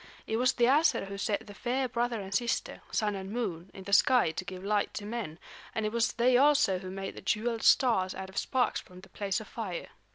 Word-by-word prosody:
It 220 - -1
was 250 +1 +3
the 240 - 0
Æsir 290 -1 +3
who 200 - -6
set 205 0 -1
the 205 - -10
fair 255 +5 -1
brother 240 -1 -1
and 190 +1 -7
sister, 235 +3 -1
Sun 210 -2 0
and 190 -1 -6
Moon, 190 -7 -3
in 190 - -10
the 200 +1 -5
sky 250 - +5
to 185 - -5
give 185 -1 -8
light 205 0 0
to 205 - -5
men; 210 -8 -5 0.4
and 220 - 0
it 215 - -1
was 230 0 +1
they 245 +1 +4
also 280 -9 +4
who 185 0 -7
made 195 +1 -5
the - - -10
jeweled 230 +1 -1
stars 190 -8 +4
out 190 0 -6
of 190 - -12
sparks 255 -1 0
from 180 0 -15
the 190 - -15
place 200 +2 -2
of 220 - -10
fire. 200 -7 -5
215 Hz, 235 wpm, -30 LUFS, 190-240 Hz, 0.4 s, sky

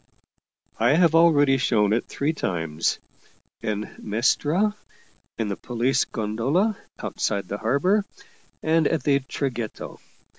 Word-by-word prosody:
" - - -38
I 140 - +5
have 165 -1 +4
already 145 -5 +5
shown 105 -5 +2
it 115 - -1
three 145 +3 -1
times 80 - -1 0.6
in 105 0 -3
Mestra, 150 - +1 0.6
in 110 - -1
the 100 - -2
police 125 +4 0
gondola 130 - 0 0.2
outside 100 -2 -2
the 100 +3 -4
harbor, 180 - +2 0.6
and 160 -1 +3
at 165 - -1
the 140 -1 +3
Traghetto. 130 -4 -5
135 Hz, 120 wpm, -24 LUFS, 110-160 Hz, 0.6 s, I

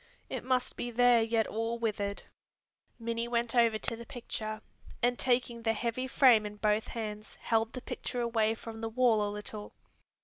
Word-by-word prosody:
It - - -3
must 255 -1 0
be 240 - -3
there 240 0 +5
yet 225 0 +2
all 225 +2 -2
withered." 205 -3 -2 0.7
Minnie 230 0 -2
went 235 -1 0
over 230 -2 +4
to 225 - 0
the 235 - -9
picture, 215 -2 -5 0.4
and 245 0 +2
taking 245 -2 +1
the 225 -1 +1
heavy 235 +3 -2
frame 250 -5 +6
in 210 0 -6
both 210 +1 +1
hands 215 -2 -6
held 225 0 0
the 255 - -6
picture 245 - -4
away 225 -2 +1
from 225 0 -9
the 225 - -2
wall 230 -2 +3
a 205 - -1
little. 210 0 -7
230 Hz, 175 wpm, -31 LUFS, 215-240 Hz, 0.7 s, frame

